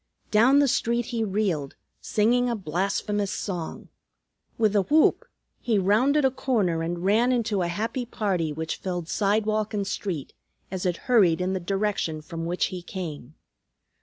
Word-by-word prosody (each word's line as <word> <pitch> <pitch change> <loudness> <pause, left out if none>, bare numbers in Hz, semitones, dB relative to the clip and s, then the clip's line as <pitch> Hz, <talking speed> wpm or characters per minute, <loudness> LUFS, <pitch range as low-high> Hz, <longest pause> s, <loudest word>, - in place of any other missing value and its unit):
Down 235 +6 +5
the 285 0 +5
street 235 -1 +1
he 230 -1 0
reeled, 190 -9 -1 0.2
singing 245 +4 +2
a 235 - 0
blasphemous 200 +3 -1
song. 180 -5 -5 0.7
With 215 -2 +2
a 200 - +5
whoop 300 +10 +3 0.3
he 230 -3 +1
rounded 250 +10 +3
a 265 - +4
corner 210 -11 0
and 170 +2 -3
ran 225 +6 +3
into 225 -5 0
a 175 - 0
happy 225 +7 -3
party 190 -9 -1
which 160 +2 -4
filled 175 -3 -4
sidewalk 215 +2 0
and 200 -1 -1
street, 185 -6 -4 0.4
as 190 -1 -2
it 175 -1 -1
hurried 200 -10 +4
in 185 +1 -1
the 190 - -1
direction 190 -4 -2
from 165 0 -6
which 175 +2 0
he 180 - -5
came. 160 -6 -7
200 Hz, 160 wpm, -25 LUFS, 175-225 Hz, 0.7 s, Down